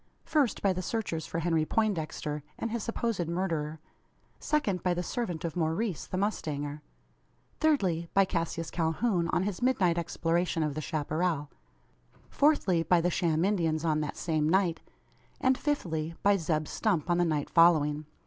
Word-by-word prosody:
First, 280 -8 +1
by 195 -2 +3
the 185 - -3
searchers 185 -5 -3
for - - -4
Henry 165 -1 +1
Poindexter 155 -6 -1 0.2
and 230 - -3
his 235 0 -2
supposed 230 -6 -2
murderer; 165 -3 -2 0.6
second, 210 - 0
by 180 -1 +1
the 175 - -2
servant 175 -6 -3
of 165 - -4
Maurice 170 - -1
the 185 - -3
mustanger; 150 -7 -2 0.8
thirdly, 185 - +1
by 195 0 +6
Cassius 165 -2 -3
Calhoun, 170 +2 0
on 175 - +1
his 200 -2 -3
midnight 190 -10 +2
exploration 170 0 0
of 150 -2 -1
the 155 - -4
chapparal; 155 0 -1 0.8
fourthly, 280 - +3
by 175 +1 +3
the 175 +2 +1
sham 165 -1 +1
Indians 165 -5 0
on 155 -1 +2
that 150 - -4
same 155 -2 0
night: 175 -3 +2 0.6
and, 260 0 +3
fifthly, 165 - -2
by 205 0 +5
Zeb 155 -4 -1
Stump 185 -9 0
on 175 -1 +2
the - - +4
night 155 -4 0
following. 155 -3 +4
170 Hz, 160 wpm, -29 LUFS, 155-195 Hz, 0.8 s, by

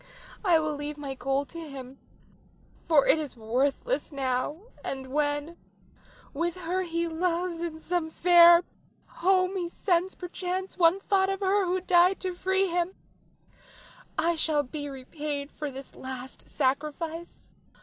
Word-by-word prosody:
I 355 -5 +5
will 310 -1 0
leave 290 +1 -5
my 280 -2 -5
gold 270 +1 -1
to 335 - -8
him, 270 -4 -9 0.9
for 310 -4 +5
it 320 - +5
is 290 -5 -5
worthless 270 - 0
now; 275 +4 -2 0.2
and 265 -1 -5
when, 295 +2 -1 0.8
with 335 +3 -1
her 355 +2 -1
he 335 -1 -1
loves 340 +1 -1
in 330 -2 -4
some 340 -1 -1
fair 345 +1 +7 0.4
home, 370 +1 +1
he 350 -2 -2
sends 360 +1 0
perchance 365 +1 -4
one 355 +2 +4
thought 385 -1 +2
of 390 +1 -2
her 390 0 +2
who 365 +1 +1
died 360 +1 +4
to 370 -1 -2
free 380 +2 +1
him, 350 +1 -1 1.2
I 335 +2 +2
shall 310 -2 +1
be 290 +2 -6
repaid 280 +2 -5
for 300 -1 -5
this 270 0 -10
last 260 0 -8
sacrifice. 305 +5 -2
330 Hz, 140 wpm, -28 LUFS, 285-360 Hz, 1.2 s, fair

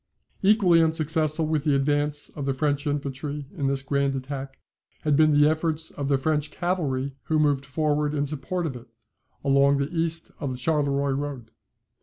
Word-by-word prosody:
Equally 190 -4 +5
unsuccessful 160 -1 +1
with 155 -2 0
the 150 -3 +2
advance 145 +1 0
of 140 -2 -6
the 135 - +1
French 145 +2 -1
infantry 145 0 -3
in 140 - -1
this 135 0 0
grand 140 0 0
attack, 135 0 -6 0.4
had 150 -2 +2
been 155 +1 +5
the 150 0 +5
efforts 160 0 0
of 140 -1 -4
the 140 -1 +3
French 150 +2 0
cavalry 145 -7 -2
who 160 - +1
moved 145 -3 +1
forward 150 +1 0
in 145 0 0
support 150 +5 -2
of 140 -5 -3
it, 125 +1 -11 0.6
along 140 0 +4
the 140 +4 -2
east 165 0 -1
of 140 -4 -3
the 125 - -5
Charleroi 140 0 +1
road. 135 -5 -5
145 Hz, 175 wpm, -25 LUFS, 140-155 Hz, 0.6 s, Equally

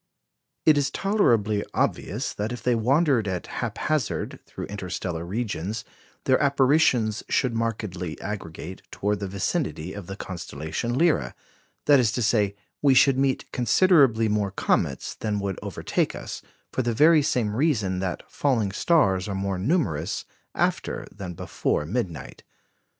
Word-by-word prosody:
It 155 -2 +6
is 140 -1 +1
tolerably 115 - +2
obvious 115 +8 -1
that 105 +3 -3
if 120 - -6
they 125 - +3
wander 135 +3 +3
at 90 -2 -3
haphazard 155 -7 -2
through - - -6
interstellar 90 -4 -4
regions 105 +1 -3 0.4
their 130 +2 +3
apparitions 135 -5 +3
should 125 -3 +1
markedly 105 -7 -3
aggregate 95 -3 -6
towards 105 0 -1
the 100 - -3
vicinity 95 - -2
of 100 -4 -8
the 95 - -5
constellation 85 - -4
Lyra; 155 - +2 0.5
that 145 -2 +6
is 115 -4 +3
to 120 - 0
say, 105 -3 +2 0.3
we 140 -2 +5
should 135 +1 +5
meet 135 -1 +1
considerably 130 - +4
more 105 -1 +1
comets 70 -8 0
than 105 -2 -2
would 100 -2 -3
overtake - - -1
us, - - -6 0.3
for - - +1
the 120 -2 -1
very 155 +4 +6
same 115 -7 0
reason 110 - +1
that 95 -1 -3
falling 115 -8 0
stars 100 - +2
are 100 - -3
more 95 -1 -2
numerous 95 - 0 0.3
after - - -1
than 95 -3 -7
before 75 - -1
midnight. 85 - -4
110 Hz, 140 wpm, -25 LUFS, 95-130 Hz, 0.5 s, It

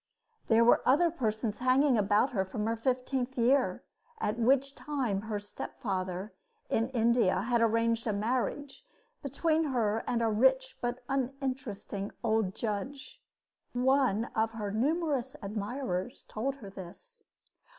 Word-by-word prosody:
There 225 +1 +5
were 240 - +6
other 325 +6 +4
persons 220 -6 -2
hanging 255 +2 +4
about 210 +4 +3
her 195 -6 +1
from 210 +3 -4
her 225 +1 0
fifteenth 255 +2 -1
year, 255 +3 +2 0.4
at 215 +3 -1
which 270 +3 +3
time 255 -8 -2
her 215 -1 -3
stepfather, 190 -1 -4 0.4
in 225 +2 +1
India, 230 -6 +2
had 235 +2 +1
arranged 230 0 +2
a - - +2
marriage 255 +6 -2 0.4
between 315 +4 +1
her 225 -6 0
and 235 -1 +1
a - - +3
rich 260 +4 +3
but 245 +1 -3
uninteresting 260 -6 -3
old 220 -4 +1
judge. 255 +5 -4 0.5
One 250 -3 +2
of 220 +1 +1
her 210 -3 -4
numerous 280 - 0
admirers 205 0 -3
told 265 +6 -3
her 210 -8 -10
this. 200 - -12
235 Hz, 130 wpm, -30 LUFS, 215-265 Hz, 0.5 s, were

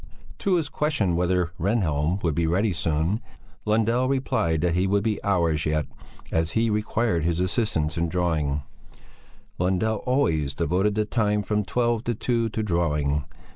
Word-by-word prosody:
To 195 -2 +2
his 165 -4 0
question 140 - 0
whether 90 -1 +1
Rehnhjelm 90 -3 0
would 80 -3 +1
be 85 +1 0
ready 95 +5 +1
soon, 80 +6 0 0.4
Lundell 115 +4 +2
replied 85 - 0
that 85 0 +1
he 90 +2 +1
would 100 +1 +2
be 110 -1 -1
hours 85 -6 +1
yet, 75 -1 0 0.5
as 80 0 0
he 115 0 +2
required 105 -4 0
his 85 +1 0
assistance 90 -5 0
in 85 0 0
drawing; 80 -5 0 1.0
Lundell 95 +5 +1
always 80 - 0
devoted 95 +6 +1
the 105 0 +1
time 105 -2 +1
from 105 +1 0
twelve 120 +2 0
to 120 - 0
two 115 0 0
to 110 0 -2
drawing. 75 -6 0
95 Hz, 155 wpm, -25 LUFS, 80-110 Hz, 1.0 s, To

